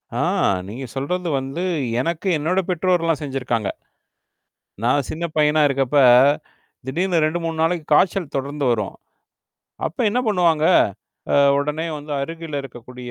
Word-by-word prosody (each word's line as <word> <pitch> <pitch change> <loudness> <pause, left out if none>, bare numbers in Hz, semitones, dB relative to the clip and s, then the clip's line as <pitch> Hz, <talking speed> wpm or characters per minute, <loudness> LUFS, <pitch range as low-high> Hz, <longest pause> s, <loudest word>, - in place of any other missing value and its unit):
ஆ! - - -1 0.5
நீங்க 115 +7 -7
சொல்றது 175 +7 -2
வந்து, 135 +6 -5 0.4
எனக்கு, 165 +7 -2
என்னோட 165 +6 0
பெற்றோர்றல்லாம் 170 -3 +1
செஞ்சிருக்காங்க. 125 -6 -2 1.1
நான் 130 +3 +2
சின்ன 165 +2 -3
பையனா 150 0 +3
இருக்கப்ப, 135 0 0 0.9
திடீர்னு 170 +4 0
2,3 165 0 -2
நாளைக்கு 165 -1 0
காய்ச்சல் 175 -1 +2
தொடர்ந்து 140 +1 -3
வரும். 110 -4 -2 0.9
அப்போ 165 - -6
என்னா 240 +5 0
பண்ணுவாங்க, 170 -6 +2 0.7
அ - - +3 0.2
உடனே 150 +3 -2
வந்து 150 +1 -8
அருகில் 165 +1 -5
இருக்கக்கூடிய 125 -1 -10
150 Hz, 120 wpm, -21 LUFS, 135-170 Hz, 1.1 s, பையனா